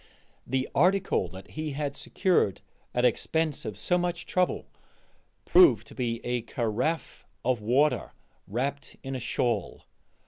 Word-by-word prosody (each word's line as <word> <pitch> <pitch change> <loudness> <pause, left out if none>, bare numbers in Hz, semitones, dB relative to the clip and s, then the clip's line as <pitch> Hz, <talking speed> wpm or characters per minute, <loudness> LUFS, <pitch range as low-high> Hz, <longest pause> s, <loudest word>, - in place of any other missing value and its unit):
The 130 +1 0
article 185 - +3
that 95 +2 -11
he 155 -1 -4
had 145 0 -3
secured 180 - +1 0.3
at 125 0 +1
expense 155 +5 0
of 105 -3 -5
so 180 +11 +2
much 175 -1 -2
trouble 180 -1 0 0.8
proved 365 -2 +6
to - - -13
be 115 -3 -2
a 120 0 0
carafe 120 +7 -2 0.2
of 125 -3 +1
water 135 +8 +2 0.4
wrapped 135 +6 -3
in 135 0 -4
a - - -2
shawl. 120 0 -1
135 Hz, 135 wpm, -28 LUFS, 120-160 Hz, 0.8 s, proved